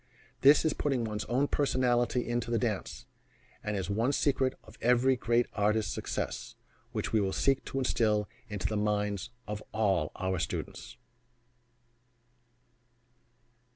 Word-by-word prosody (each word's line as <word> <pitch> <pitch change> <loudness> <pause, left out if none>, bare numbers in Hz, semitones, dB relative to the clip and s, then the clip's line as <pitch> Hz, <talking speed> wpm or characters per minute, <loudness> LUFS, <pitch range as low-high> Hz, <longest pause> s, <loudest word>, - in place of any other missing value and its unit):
This 145 +4 +6
is 155 - +2
putting 135 -5 0
one's 105 -2 -3
own 130 +5 +1
personality 125 -3 +1
into 120 -1 -1
the 120 - +2
dance, 110 -5 -2 0.6
and 105 -1 -2
is 95 -3 -2
one 110 +7 +1
secret 135 -2 +1
of 110 - -15
every 125 +2 +4
great 120 0 +2
artist's 105 -1 +1
success, - - -4 0.4
which - - -3
we 100 -3 +2
seek 135 -1 +2
to - - -5
instill 110 -5 +1 0.2
into 105 -3 -4
the 110 - 0
minds 105 +1 0 0.2
of 105 0 -4
all 95 -8 +1
our 95 -1 -1
students. - - -5
115 Hz, 130 wpm, -30 LUFS, 105-125 Hz, 0.6 s, This